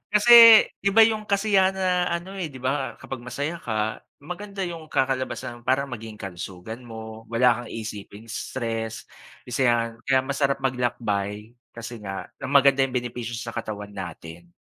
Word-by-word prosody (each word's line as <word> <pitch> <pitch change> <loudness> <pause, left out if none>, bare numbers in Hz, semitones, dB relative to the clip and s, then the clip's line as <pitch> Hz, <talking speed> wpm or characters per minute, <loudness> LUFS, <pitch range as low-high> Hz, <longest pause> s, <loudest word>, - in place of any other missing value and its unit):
Kasi 230 +1 +9 0.2
iba 205 +3 +6
'yung 215 -1 -1
kasiyahan 200 -2 +2
na 180 -1 +1
ano, 170 +3 -4
eh, 180 -5 -3
'di 135 - -12
ba, 135 +2 -2
kapag 130 -2 -7
masaya 145 +7 -4
ka, 110 -1 -2 0.2
maganda 195 +3 -5
'yung 165 -3 -7
kakalabasan, 130 -3 -2
parang 135 0 +1
maging 110 -2 -7
kalusugan 95 +3 -7
mo, 110 -1 -9
wala 120 0 +2
kang - - -11
iisiping 105 -1 -7
stress, 115 -1 -4 0.4
isa 125 +1 +1
'yan. 115 -1 +2 0.2
Kaya 135 -1 +3
masarap 140 0 0
maglakbay 110 -5 -2 0.2
kasi 115 0 -7
nga, 95 -2 -6
na - - -5
maganda 140 -1 +5
'yung 130 -1 -3
benepisyo 120 -1 -4
sa 115 0 -6
katawan 105 -2 -6
natin. 85 -2 -9
125 Hz, 150 wpm, -24 LUFS, 110-155 Hz, 0.4 s, Kasi